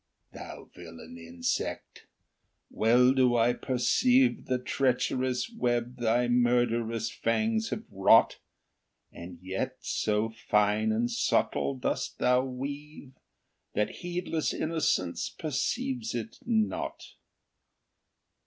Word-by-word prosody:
Thou - - -9
villain 85 -1 -11
insect! 85 0 -4 0.6
well 125 +3 +4
do 130 -2 +3
I 120 +1 +3
perceive 245 - +2
The 130 - +1
treacherous 125 0 0
web 120 - -1
thy 120 +1 +1
murderous 120 -2 +1
fangs 220 - 0
have 215 - -4
wrought, 100 +4 +4 0.7
And 85 +1 -10
yet 95 +1 -3
so 105 +1 0
fine 105 -1 +1
and 115 +2 +1
subtle 70 -1 0
dost 65 - -3
thou 125 0 +3
weave, 140 +2 -7 0.6
That 105 0 -1
heedless 175 -2 -2
innocence 155 - -1
perceives 230 - -3
it 225 - -5
uot. 320 +9 -1
125 Hz, 95 wpm, -28 LUFS, 110-155 Hz, 0.7 s, well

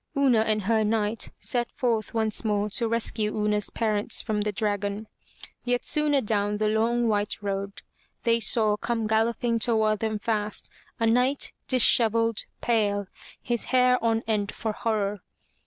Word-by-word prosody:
Una 265 -5 +4
and 215 -1 +1
her 220 +2 +2
knight 215 0 0
set 240 -2 -2
forth 230 -4 -1
once 220 -1 -1
more 210 -1 0
to 230 +2 +1
rescue 220 -2 -1
Una's 210 -1 +1
parents 215 -2 0
from 210 -1 -2
the 210 0 -1
dragon. 205 0 -2 0.6
Yet 245 0 -1
soon 300 -1 +2
adown 210 -5 0
the 215 0 +1
long, 230 +2 +1
white 205 -1 -1
road 200 0 -4 0.4
they 230 0 +2
saw 215 -1 +2
come 230 0 -2
galloping 230 +2 +1
toward 220 -2 +1
them 220 -1 -1
fast, 210 -1 -2 0.3
a 230 - +1
knight, 250 +5 +2
disheveled, 230 -3 +3 0.2
pale, 205 -4 +1 0.4
his 240 -1 -2
hair 250 -1 +3
on 225 0 +1
end 210 -2 -1
for 220 - -3
horror. 210 -2 -2
220 Hz, 150 wpm, -26 LUFS, 210-230 Hz, 0.6 s, Una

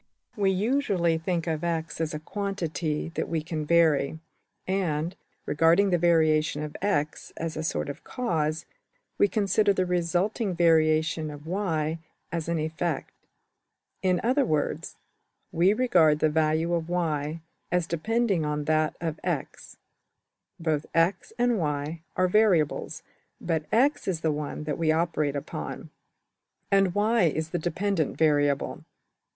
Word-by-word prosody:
We 200 -3 +2
usually 190 -5 +1
think 170 0 -1
of 160 -1 -2
$x$ 165 -1 -2
as 155 -1 -2
a - - -4
quantity 165 -4 -3
that 165 - -4
we 160 -2 -1
can 155 -2 -4
vary; 160 -3 +3 0.5
and, 175 -3 -1 0.3
regarding 165 +6 +3
the 175 - +3
variation 155 -3 +3
of~$x$ 150 0 -2
as 165 -1 -3
a 155 - -3
sort 160 - -2
of 140 - -7
\emph{cause}, 160 -10 -2 0.5
we 205 - +6
consider 205 0 +2
the 185 -1 0
resulting 180 +4 0
variation 160 -1 +3
of~$y$ 160 +1 -2 0.3
as 165 -1 -3
an 170 - 0
\emph{effect}. 160 0 -2 0.9
In 185 -1 +2
other 260 +5 +3
words, 155 - -1 0.6
we 175 +4 +4
regard 180 -10 +4
the 155 - +2
value 160 +2 +1
of~$y$ 165 -2 -1 0.3
as 180 -1 +2
depending 195 +2 0
on 150 0 -1
that 155 0 +1
of~$x$. 160 -2 -4 0.8
Both 155 -2 -1
$x$~and~$y$ 165 -4 0
are 185 - +3
variables, 180 -6 +2 0.4
but 160 -3 -1
$x$ 275 +6 +2
is 175 -4 -1
the 160 - +1
one 150 0 -4
that 150 -1 -3
we 160 -1 +3
operate 155 -3 0
upon, 140 - -6 0.8
and 195 -2 +3
$y$~is 205 -7 +2
the 175 - -1
``dependent 175 -1 -1
variable.'' 145 -3 +1
165 Hz, 125 wpm, -27 LUFS, 155-185 Hz, 0.9 s, we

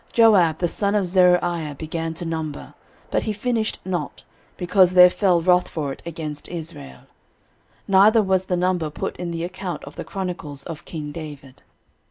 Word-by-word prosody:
13:027:024 - - -20
Joab 195 -9 +5
the 175 - 0
son 200 +4 +1
of 205 -2 +2
Zeruiah 175 -4 +2
began 160 +2 -4
to 170 - -5
number, 160 -3 -5 0.4
but - - +1
he 215 - -2
finished 225 +1 -1
not, 185 -2 -4 0.3
because 180 0 +3
there 180 0 +9
fell 180 -5 +2
wrath 180 0 +3
for 145 -4 -4
it - - -14
against 155 -3 -4
Israel; 160 -5 -6 0.9
neither 210 +3 +5
was 190 -1 +1
the 180 -1 -1
number 180 -3 0
put 150 - -5
in 175 -1 -4
the 165 0 -4
account 180 -1 -5
of 145 - -11
the - - -4
chronicles 175 -8 -5
of 165 -1 -8
king 150 -3 -6
David. 145 -5 -10
175 Hz, 175 wpm, -22 LUFS, 160-185 Hz, 0.9 s, there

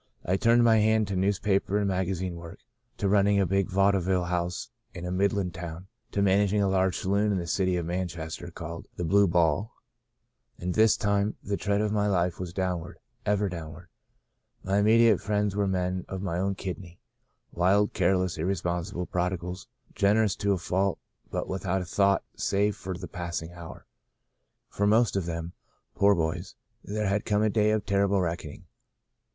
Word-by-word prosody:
I 90 - +1
turned 115 +4 +4
my 115 -1 +5
hand 110 0 +3
to 100 - -2
newspaper 100 +1 +1
and 105 -1 +1
maga 95 0 0
zine 90 0 -3
work, 85 -1 -9 0.4
to 100 - 0
running 100 0 +3
a 100 - +3
big 95 +1 0
vaudeville 95 -1 +2
house 90 0 -2 0.2
in 90 - -6
a 90 - -3
Midland 95 -1 0
town, 85 +2 -7 0.2
to 100 - 0
managing 100 +1 +3
a 100 - +2
large 95 -2 +1
sa - - -5
loon 100 +2 +2
in 100 - +1
the 85 - -3
city 90 +2 0
of 85 - -2
Manchester, 85 -1 -4
called 85 -1 -8
*The 90 - -4
Blue 100 +4 +4
Ball.' 85 +4 +1 0.9
All 90 +1 -2
this 110 +3 +4
time 100 +1 0
the 100 - -1
trend 100 +1 0
of 105 - 0
my 105 -1 +1
life 90 -3 0
was 90 -2 -5
downward 90 -2 -3 0.2
— - - -40
ever 105 0 +2
downward. 85 -1 -8 0.7
My 100 +2 +1
imme 110 +2 +5
diate 115 -4 +5
friends 105 -1 0
were 100 -1 +1
men 90 -1 -1
of 95 0 -5
my 90 -3 -2
own 95 +1 0
kidney 90 -2 -7 0.3
— - - -48
wild, 100 +4 +2
careless, 90 -3 +1
irresponsible 90 +1 -2
prodigals, 90 +1 -3 0.3
gener 105 +3 +3
ous 100 -3 0
to 100 -1 +1
a - - 0
fault, 95 +2 0 0.3
but - - -3
without 95 0 -2
a - - -8
thought 100 +2 +2
save 100 +1 +1
for 95 -1 -6
the 90 0 -7
passing 85 -2 -5
hour. 85 -2 -10 0.8
For 100 - -1
most 110 +1 +3
of 95 -3 -1
them, 85 0 -4 0.4
poor 100 0 +4
boys, 85 +2 -3 0.3
there 105 +1 -3
has 100 +1 +1
come 105 0 +1
a 110 - +2
day 105 -1 +3
of 110 -2 0
terrible 100 0 +2
reck 85 -1 -1
oning. 75 - -10
95 Hz, 190 wpm, -27 LUFS, 90-100 Hz, 0.9 s, my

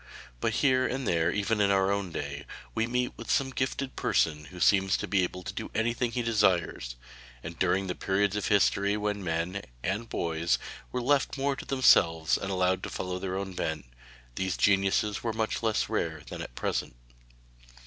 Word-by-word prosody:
But - - 0
here 130 -1 +4
and 130 -2 -3
there 85 -1 +2
even 105 +2 0
in 100 - +4
our 95 0 +3
own 100 -3 -1
day, - - -5 0.3
we 115 - 0
meet 125 +1 -1
with 115 - -9
some 135 -1 +2
gifted 130 +1 -2
person 75 -2 +1
who 90 +6 -11
seems 95 0 +4
to - - -4
be 100 -2 +2
able 90 0 -3
to - - -5
do - - -5
anything 120 +2 0
he 120 0 -1
desires, 95 - +1 0.5
and 85 0 -8
during 95 +1 +2
the 90 - -2
periods 100 +2 0
of 105 - -1
history 100 0 +3
when 105 -1 -2
men 85 +3 -2 0.2
and 105 +6 -2
boys 85 0 0 0.3
were 125 -1 -2
left 140 +2 +2
more 140 0 0
to - - -8
themselves 80 -11 +4
and 100 - -3
allowed 95 -1 +1
to - - -5
follow 90 0 -4
their 95 0 -3
own 95 -1 -4
bent, 80 -5 -3 0.5
these 95 +7 -2
geniuses 100 +1 +2
were 115 -2 -2
much 110 0 -1
less 110 -2 +1
rare - - -2
than - - -6
at - - -8
present. - - -2
100 Hz, 190 wpm, -29 LUFS, 90-115 Hz, 0.5 s, here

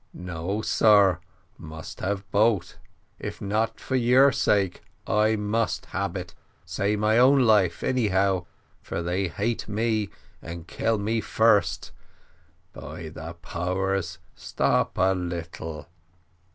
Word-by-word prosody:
No, 90 +4 -4
sar 100 -5 +4 0.4
must 80 -1 -9
have 100 +1 -3
boat 105 -4 +2 0.4
if - - -6
not 110 +3 -1
for 130 - -3
your 130 +3 +5
sake, 100 -7 +1 0.2
I 110 +1 +2
must 105 +2 -1
hab 100 -1 -2
it, 90 -2 -7 0.3
save 100 +2 -1
my 110 +2 +3
own 135 +2 +6
life 105 -8 +3
anyhow, 95 -7 +1 0.3
for 85 - -4
they 90 +3 -1
hate 110 +7 -2
me 110 -1 0 0.3
and 85 0 -8
kill 115 +4 0
me 110 +2 -1
first; 105 -4 +2 0.8
by 80 - -8
de 80 +1 -8
powers, 90 0 -2 0.2
stop - - 0
a 95 +1 +3
little." 80 -4 -5
100 Hz, 120 wpm, -25 LUFS, 90-110 Hz, 0.8 s, own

